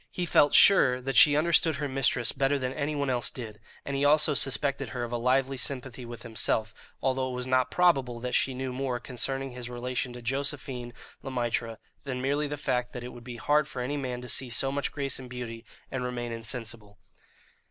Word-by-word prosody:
He 180 Hz, -, -3 dB
felt 145 Hz, -2 st, +4 dB
sure 135 Hz, -10 st, +7 dB
that 135 Hz, +1 st, -4 dB
she 145 Hz, -2 st, +8 dB
understood 160 Hz, 0 st, +3 dB
her 145 Hz, +1 st, -2 dB
mistress 130 Hz, -3 st, +2 dB
better 140 Hz, +1 st, +1 dB
than 130 Hz, -1 st, -3 dB
anyone 140 Hz, -2 st, -1 dB
else 120 Hz, -2 st, +2 dB
did, 110 Hz, -4 st, -8 dB, 0.3 s
and 140 Hz, -, -3 dB
he 135 Hz, -, 0 dB
also 150 Hz, +1 st, +5 dB
suspected 140 Hz, -1 st, +1 dB
her 120 Hz, +1 st, -4 dB
of 120 Hz, -, -5 dB
a -, -, -1 dB
lively 130 Hz, +2 st, +1 dB
sympathy 130 Hz, -1 st, -3 dB
with 120 Hz, -1 st, -9 dB
himself, 110 Hz, -1 st, -1 dB, 0.3 s
although 130 Hz, 0 st, +1 dB
it 125 Hz, -, -4 dB
was 125 Hz, 0 st, -3 dB
not 130 Hz, -1 st, +2 dB
probable 135 Hz, -9 st, +2 dB
that 125 Hz, +1 st, -4 dB
she 130 Hz, -, +2 dB
knew 130 Hz, 0 st, -4 dB
more 130 Hz, -1 st, -2 dB
concerning 135 Hz, +2 st, -3 dB
his 125 Hz, -1 st, -6 dB
relation 125 Hz, +1 st, -3 dB
to 120 Hz, -, -9 dB
Josephine 135 Hz, -1 st, -2 dB, 0.3 s
Le -, -, -6 dB
Maître 120 Hz, -2 st, -2 dB, 0.3 s
than 130 Hz, -3 st, -4 dB
merely 145 Hz, +3 st, 0 dB
the 145 Hz, 0 st, -4 dB
fact 125 Hz, -3 st, -1 dB
that 125 Hz, -, -6 dB
it 125 Hz, -, -6 dB
would 120 Hz, -, -11 dB
be 120 Hz, -1 st, -8 dB
hard 150 Hz, +4 st, +2 dB
for -, -, -7 dB
any 125 Hz, +4 st, -2 dB
man 125 Hz, -3 st, -3 dB
to -, -, -7 dB
see 130 Hz, +1 st, -2 dB
so 135 Hz, +3 st, 0 dB
much 140 Hz, -1 st, -2 dB
grace 140 Hz, -2 st, -2 dB
and 130 Hz, -1 st, -9 dB
beauty 120 Hz, -2 st, -6 dB, 0.3 s
and 130 Hz, -1 st, -2 dB
remain 120 Hz, -1 st, -3 dB
insensible. 115 Hz, -2 st, -5 dB
130 Hz, 210 wpm, -28 LUFS, 120-140 Hz, 0.3 s, she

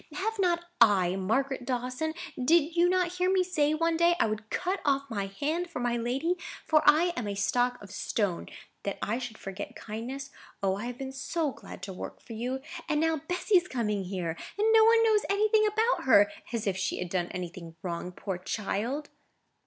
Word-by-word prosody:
Have 440 Hz, +3 st, -2 dB
not 345 Hz, -2 st, +2 dB, 0.2 s
I, 190 Hz, -5 st, +5 dB
Margaret 255 Hz, +8 st, 0 dB
Dawson? 255 Hz, +5 st, -2 dB, 0.2 s
Did 320 Hz, +5 st, +3 dB
you 350 Hz, +1 st, +5 dB
not 365 Hz, -1 st, +2 dB
hear 365 Hz, +1 st, +2 dB
me 380 Hz, -1 st, +4 dB
say, 310 Hz, -4 st, +1 dB
one 330 Hz, +1 st, +1 dB
day, 340 Hz, +1 st, +4 dB
I -, -, +4 dB
would 215 Hz, 0 st, -3 dB
cut 370 Hz, +2 st, -1 dB
off 275 Hz, -1 st, +2 dB
my 200 Hz, -3 st, -2 dB
hand 310 Hz, -, -2 dB
for 335 Hz, -, -5 dB
my 240 Hz, -1 st, 0 dB
lady; 255 Hz, +9 st, 0 dB, 0.3 s
for 305 Hz, -1 st, +4 dB
am 295 Hz, -, +8 dB, 0.3 s
I -, -, -2 dB
a 200 Hz, -, -3 dB
stick 245 Hz, +5 st, +2 dB
or -, -, -15 dB
a 205 Hz, -, -10 dB
stone, 200 Hz, -2 st, -2 dB, 0.3 s
that 200 Hz, -, -3 dB
I 230 Hz, +4 st, 0 dB
should 245 Hz, -3 st, -6 dB
forget 195 Hz, +1 st, -7 dB
kindness? 255 Hz, +6 st, -6 dB, 0.3 s
O, 190 Hz, -1 st, +2 dB
I 205 Hz, +4 st, -5 dB
have 245 Hz, 0 st, -6 dB
been 265 Hz, 0 st, -5 dB
so 295 Hz, +3 st, -1 dB
glad 195 Hz, -, -11 dB
to 195 Hz, -1 st, -5 dB
work -, -, -7 dB
for 230 Hz, -, -10 dB
you. 250 Hz, +4 st, -3 dB, 0.3 s
And 300 Hz, -, +2 dB
now 320 Hz, -2 st, +1 dB
Bessy 360 Hz, +2 st, +3 dB
is 355 Hz, 0 st, +1 dB
coming 210 Hz, -, -1 dB
here; 180 Hz, -3 st, -3 dB, 0.2 s
and 425 Hz, +2 st, +2 dB
no 445 Hz, 0 st, +8 dB
one 455 Hz, 0 st, +6 dB
knows 435 Hz, -2 st, +4 dB
anything 430 Hz, +2 st, +4 dB
about 440 Hz, -, +1 dB
her—as 235 Hz, 0 st, +3 dB
if 195 Hz, -3 st, +1 dB
she -, -, -1 dB
had 180 Hz, -, -4 dB
done 175 Hz, -1 st, 0 dB
anything 175 Hz, -2 st, -7 dB
wrong, 175 Hz, 0 st, -4 dB
poor 185 Hz, 0 st, -5 dB
child!" 225 Hz, +9 st, -3 dB
260 Hz, 200 wpm, -29 LUFS, 205-340 Hz, 0.3 s, am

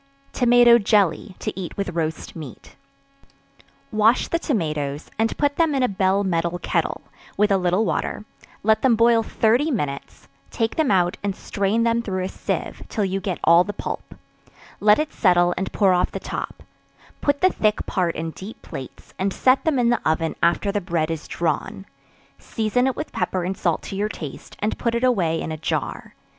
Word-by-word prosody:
Tomato 240 Hz, -1 st, +6 dB
Jelly, 200 Hz, -3 st, +1 dB
to -, -, -4 dB
eat 185 Hz, -2 st, -6 dB
with 200 Hz, -2 st, -2 dB
Roast 160 Hz, -2 st, -3 dB
Meat. 150 Hz, -8 st, -10 dB, 1.2 s
Wash 215 Hz, +3 st, +3 dB
the 335 Hz, -, 0 dB
tomatoes, 150 Hz, -, -2 dB
and 225 Hz, 0 st, 0 dB
put 285 Hz, -1 st, +1 dB
them 325 Hz, -4 st, +2 dB
in 265 Hz, -, +1 dB
a -, -, +4 dB
bell 195 Hz, -1 st, +1 dB
metal 170 Hz, -2 st, 0 dB
kettle, -, -, -1 dB, 0.4 s
with 210 Hz, 0 st, +3 dB
a 195 Hz, -, +4 dB
little 180 Hz, +4 st, +1 dB
water; 210 Hz, -, -2 dB, 0.4 s
let 220 Hz, +1 st, +3 dB
them 255 Hz, -3 st, +4 dB
boil 230 Hz, 0 st, +4 dB
thirty 235 Hz, +6 st, +1 dB
minutes; 145 Hz, -, -4 dB, 0.2 s
take 225 Hz, -1 st, -1 dB
them 315 Hz, -3 st, +1 dB
out 180 Hz, -2 st, +2 dB
and 200 Hz, -2 st, -2 dB
strain 200 Hz, +4 st, -1 dB
them 230 Hz, 0 st, +2 dB
through 185 Hz, -5 st, -3 dB
a 185 Hz, -, -3 dB
sieve, -, -, -4 dB
till 210 Hz, -, -1 dB
you 195 Hz, +1 st, -2 dB
get 185 Hz, -2 st, -2 dB
all 170 Hz, +2 st, +6 dB
the 205 Hz, -, -5 dB
pulp; -, -, -6 dB, 0.6 s
let 210 Hz, 0 st, +5 dB
it 305 Hz, 0 st, -2 dB
settle 175 Hz, -3 st, +3 dB
and 190 Hz, -, -3 dB
pour 195 Hz, -3 st, +3 dB
off 180 Hz, -, +2 dB
the -, -, -4 dB
top; -, -, -6 dB, 0.6 s
put 285 Hz, -1 st, +1 dB
the 370 Hz, 0 st, +5 dB
thick 215 Hz, -1 st, 0 dB
part 180 Hz, -4 st, -1 dB
in 160 Hz, 0 st, -3 dB
deep 195 Hz, +7 st, -10 dB
plates, 130 Hz, -, -9 dB
and 195 Hz, +1 st, 0 dB
set 255 Hz, +6 st, +3 dB
them 315 Hz, -4 st, +2 dB
in 240 Hz, -1 st, +3 dB
the 240 Hz, -, +1 dB
oven 160 Hz, +1 st, 0 dB
after 170 Hz, +4 st, +2 dB
the 205 Hz, 0 st, -1 dB
bread 165 Hz, -3 st, -1 dB
is 160 Hz, -1 st, -5 dB
drawn; 170 Hz, +3 st, -2 dB, 0.5 s
season 230 Hz, +3 st, 0 dB
it 265 Hz, -, 0 dB
with 305 Hz, -, -5 dB
pepper 180 Hz, 0 st, -2 dB
and 185 Hz, +2 st, -2 dB
salt 170 Hz, -4 st, -1 dB
to -, -, -6 dB
your 205 Hz, +2 st, -1 dB
taste, 150 Hz, -9 st, -8 dB
and 210 Hz, +1 st, -1 dB
put 235 Hz, -1 st, 0 dB
it 235 Hz, -, -1 dB
away 180 Hz, -10 st, +2 dB
in 160 Hz, -, -4 dB
a 155 Hz, -, -4 dB
jar. 155 Hz, -, -3 dB
200 Hz, 190 wpm, -22 LUFS, 175-230 Hz, 1.2 s, Tomato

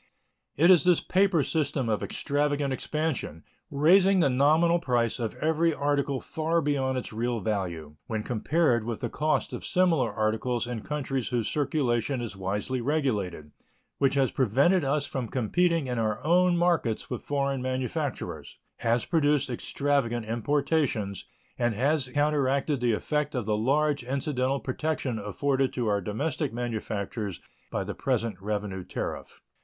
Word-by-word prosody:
It 170 Hz, +6 st, +6 dB
is 175 Hz, -6 st, +6 dB
this 180 Hz, -2 st, +4 dB
paper 185 Hz, -5 st, +2 dB
system 145 Hz, -5 st, -1 dB
of 110 Hz, -2 st, 0 dB
extravagant 145 Hz, -1 st, -1 dB
expansion, 150 Hz, -, -3 dB, 0.3 s
raising 185 Hz, +7 st, +5 dB
the 140 Hz, -6 st, +3 dB
nominal 155 Hz, +6 st, +4 dB
price 120 Hz, -6 st, 0 dB
of 115 Hz, -3 st, -3 dB
every 160 Hz, +1 st, +1 dB
article 140 Hz, -1 st, 0 dB
far 160 Hz, +4 st, -1 dB
beyond 135 Hz, -4 st, 0 dB
its 125 Hz, -, -5 dB
real 120 Hz, +1 st, -1 dB
value 85 Hz, -7 st, -3 dB
when 110 Hz, -2 st, -2 dB
compared 125 Hz, +1 st, +1 dB
with 115 Hz, 0 st, -4 dB
the -, -, -3 dB
cost 155 Hz, +1 st, 0 dB
of -, -, -5 dB
similar 165 Hz, -, +2 dB
articles 110 Hz, +3 st, -1 dB
in 120 Hz, -2 st, -4 dB
countries 135 Hz, -3 st, -3 dB
whose 120 Hz, -3 st, -1 dB
circulation 135 Hz, -4 st, 0 dB
is 115 Hz, -4 st, -5 dB
wisely 105 Hz, +7 st, -2 dB
regulated, 105 Hz, -, -1 dB, 0.5 s
which 140 Hz, 0 st, +2 dB
has 135 Hz, -2 st, +2 dB
prevented 140 Hz, -, +3 dB
us 140 Hz, +1 st, 0 dB
from 130 Hz, -4 st, -4 dB
competing 165 Hz, +8 st, +1 dB
in 125 Hz, -2 st, -2 dB
our 110 Hz, -2 st, 0 dB
own 175 Hz, +2 st, +4 dB
markets 170 Hz, -12 st, 0 dB
with 125 Hz, -, -3 dB
foreign 140 Hz, -2 st, -1 dB
manufacturers, 130 Hz, -1 st, -3 dB, 0.2 s
has 115 Hz, 0 st, +1 dB
produced 150 Hz, -5 st, +2 dB
extravagant 120 Hz, -2 st, -1 dB
importations, 120 Hz, -3 st, 0 dB, 0.3 s
and 120 Hz, -2 st, +1 dB
has 135 Hz, +3 st, +1 dB
counteracted 145 Hz, 0 st, +1 dB
the 120 Hz, -2 st, +2 dB
effect 150 Hz, +5 st, -1 dB
of 125 Hz, -4 st, -1 dB
the 105 Hz, 0 st, +1 dB
large 140 Hz, +5 st, +1 dB
incidental 135 Hz, +1 st, -1 dB
protection 135 Hz, -3 st, -2 dB
afforded 135 Hz, +6 st, 0 dB
to 125 Hz, -, -2 dB
our 100 Hz, -1 st, +1 dB
domestic 140 Hz, -, -2 dB
manufactures 110 Hz, -4 st, -4 dB, 0.3 s
by -, -, -2 dB
the -, -, -5 dB
present 115 Hz, -3 st, -1 dB
revenue 100 Hz, -2 st, -3 dB
tariff. -, -, -6 dB
130 Hz, 145 wpm, -27 LUFS, 115-150 Hz, 0.5 s, It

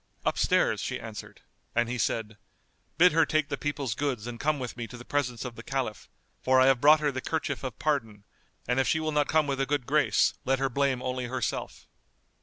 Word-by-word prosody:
"Upstairs," -, -, +2 dB
she -, -, -3 dB
answered; -, -, -9 dB, 0.3 s
and 120 Hz, 0 st, +2 dB
he 120 Hz, +1 st, -3 dB
said, 110 Hz, -3 st, -2 dB, 0.6 s
"Bid 180 Hz, +2 st, +7 dB
her 165 Hz, +1 st, +4 dB
take 155 Hz, -2 st, 0 dB
the -, -, -1 dB
people's 145 Hz, -5 st, -2 dB
goods 130 Hz, -4 st, -2 dB
and 120 Hz, -1 st, -6 dB
come 150 Hz, +1 st, +1 dB
with 125 Hz, -3 st, -5 dB
me 120 Hz, -2 st, -5 dB
to 125 Hz, -, -10 dB
the 120 Hz, -, -11 dB
presence 130 Hz, -4 st, -2 dB
of 125 Hz, -2 st, -6 dB
the 115 Hz, -, -8 dB
Caliph; 125 Hz, -4 st, -4 dB, 0.3 s
for 130 Hz, 0 st, +4 dB
I 130 Hz, -, +6 dB
have 135 Hz, -2 st, +4 dB
brought 150 Hz, +1 st, +7 dB
her 150 Hz, -1 st, +1 dB
the 130 Hz, -1 st, -4 dB
kerchief 145 Hz, -4 st, -3 dB
of 125 Hz, -5 st, -5 dB
pardon, 115 Hz, -9 st, -1 dB, 0.4 s
and 125 Hz, +2 st, +1 dB
if 135 Hz, -, +2 dB
she 160 Hz, -, +2 dB
will 155 Hz, 0 st, -1 dB
not 150 Hz, -1 st, +1 dB
come 155 Hz, -1 st, +3 dB
with 135 Hz, -1 st, -1 dB
a 135 Hz, -, 0 dB
good 145 Hz, -2 st, -1 dB
grace, 150 Hz, +3 st, +3 dB
let 135 Hz, -1 st, +1 dB
her 135 Hz, 0 st, 0 dB
blame 135 Hz, -1 st, 0 dB
only 125 Hz, 0 st, -2 dB
herself." 125 Hz, 0 st, -4 dB
135 Hz, 220 wpm, -28 LUFS, 120-145 Hz, 0.6 s, Bid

